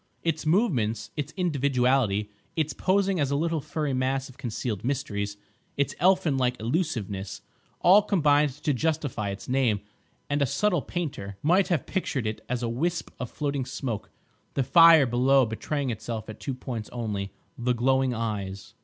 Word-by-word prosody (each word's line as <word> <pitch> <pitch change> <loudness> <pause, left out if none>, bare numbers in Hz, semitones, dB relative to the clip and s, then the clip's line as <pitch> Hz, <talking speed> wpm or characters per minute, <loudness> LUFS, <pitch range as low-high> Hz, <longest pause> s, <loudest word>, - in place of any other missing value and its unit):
Its 160 -1 -1
movements, 115 - +1
its 150 -1 -3
individuality, 130 - +1 0.2
its 155 -3 0
posing 195 -1 +1
as 140 -2 +1
a 140 - 0
little 165 +1 0
furry 150 -1 -2
mass 130 +1 0
of 130 - -15
concealed 115 -4 -3
mysteries, 105 -6 -2 0.4
its 140 - +1
elfin 185 -6 +3
like 125 -1 +1
elusiveness, 110 - -2 0.4
all 195 +4 +7
combined 150 -7 +3
to 145 +2 -2
justify 145 -7 -1
its 100 0 -7
name; 125 -5 +2 0.5
and 145 0 0
a 140 - +3
subtle 190 - +1
painter 135 - -5
might 180 +6 +4
have 170 -6 0
pictured 145 - -2
it 110 0 -3
as 125 -1 -1
a - - 0
wisp 165 +9 -2
of 125 - -4
floating 140 -2 -2
smoke, 125 -4 -4 0.5
the 135 - +2
fire 165 +1 +8
below 130 +2 +4
betraying 130 +5 -2
itself 110 0 -5
at 110 -1 -9
two 135 - -4
points 120 -4 -5
only—the 115 - -3
glowing 130 +2 +2
eyes. 100 -4 -4
130 Hz, 155 wpm, -27 LUFS, 115-155 Hz, 0.5 s, fire